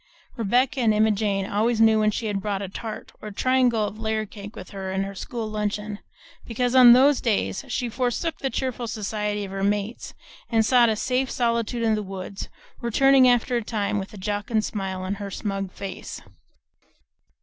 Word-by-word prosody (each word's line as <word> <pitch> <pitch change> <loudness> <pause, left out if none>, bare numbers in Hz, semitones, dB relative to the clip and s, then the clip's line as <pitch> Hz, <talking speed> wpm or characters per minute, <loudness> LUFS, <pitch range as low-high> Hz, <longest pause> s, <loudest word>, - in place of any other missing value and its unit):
Rebecca 245 +4 +1
and 220 -3 +3
Emma 215 +1 +4
Jane 200 -2 0
always 220 +3 0
knew 220 -1 +5
when 215 0 +3
she 215 +2 -3
had 205 -2 -1
brought 200 -1 -2
a - - -4
tart 215 +3 -7
or 215 - -7
a - - -6
triangle 245 -1 +2
of 210 +1 -6
layer 220 -1 -1
cake 205 +1 -10
with - - -10
her 195 0 -3
school 225 +3 -5
luncheon, 210 -1 -3 0.4
because 245 +1 -1
on 250 -2 +9
those 270 +3 +5
days 215 -1 0
she 245 -1 -2
forsook 250 +7 -2
the 270 - -1
cheerful 255 -3 -3
society 210 -1 -2
of 190 - -9
her 195 0 -3
mates 205 +3 -2 0.3
and 225 -2 +3
sought 240 -1 +5
a 220 - +1
safe 255 +3 0
solitude 235 -1 0
in 225 -1 +3
the 215 - 0
woods, 195 0 -7 0.3
returning 260 +2 +5
after 245 0 +2
a 235 - -2
time 210 -2 -1
with 195 - -6
a 210 - -11
jocund 205 +2 -1
smile 190 -3 -4
on 185 +1 -2
her 200 - -4
smug 195 -1 -4
face. 195 -1 -7
215 Hz, 185 wpm, -24 LUFS, 200-240 Hz, 0.4 s, on